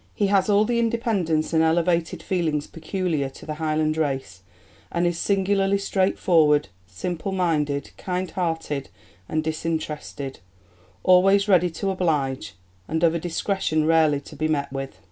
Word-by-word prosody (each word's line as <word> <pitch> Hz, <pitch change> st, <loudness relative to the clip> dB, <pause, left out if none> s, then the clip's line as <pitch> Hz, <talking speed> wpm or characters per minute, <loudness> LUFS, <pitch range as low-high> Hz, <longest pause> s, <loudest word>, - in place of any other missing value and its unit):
"He 205 Hz, -, +1 dB
has 195 Hz, +1 st, +3 dB
all 205 Hz, +1 st, +4 dB
the 235 Hz, +1 st, 0 dB
independence 215 Hz, -10 st, 0 dB
and 160 Hz, -, +4 dB
elevated 165 Hz, +1 st, +1 dB
feelings 160 Hz, -5 st, -1 dB
peculiar 165 Hz, -5 st, -2 dB
to 135 Hz, -, -13 dB
the 155 Hz, -, -4 dB
Highland 155 Hz, 0 st, 0 dB
race, 135 Hz, -12 st, -2 dB, 0.5 s
and 170 Hz, +1 st, 0 dB
is 175 Hz, -1 st, 0 dB
singularly 195 Hz, 0 st, +2 dB
straightforward, 170 Hz, -6 st, +2 dB, 0.2 s
simple 175 Hz, -, -4 dB
minded, 150 Hz, -6 st, 0 dB
kind 185 Hz, 0 st, -3 dB
hearted 160 Hz, -6 st, -2 dB, 0.4 s
and 155 Hz, 0 st, 0 dB
disinterested; 155 Hz, -3 st, -4 dB, 0.6 s
always 195 Hz, +2 st, +5 dB
ready 180 Hz, -3 st, +4 dB
to 195 Hz, +4 st, -2 dB
oblige; 140 Hz, -, -1 dB, 0.3 s
and 160 Hz, +1 st, -1 dB
of 165 Hz, -1 st, +5 dB
a 170 Hz, -, -1 dB
discretion 165 Hz, -2 st, -1 dB
rarely 160 Hz, -3 st, +4 dB
to 150 Hz, -, -12 dB
be 155 Hz, +2 st, -1 dB
met 140 Hz, -3 st, -1 dB
with." 135 Hz, 0 st, -5 dB
165 Hz, 145 wpm, -24 LUFS, 150-185 Hz, 0.6 s, always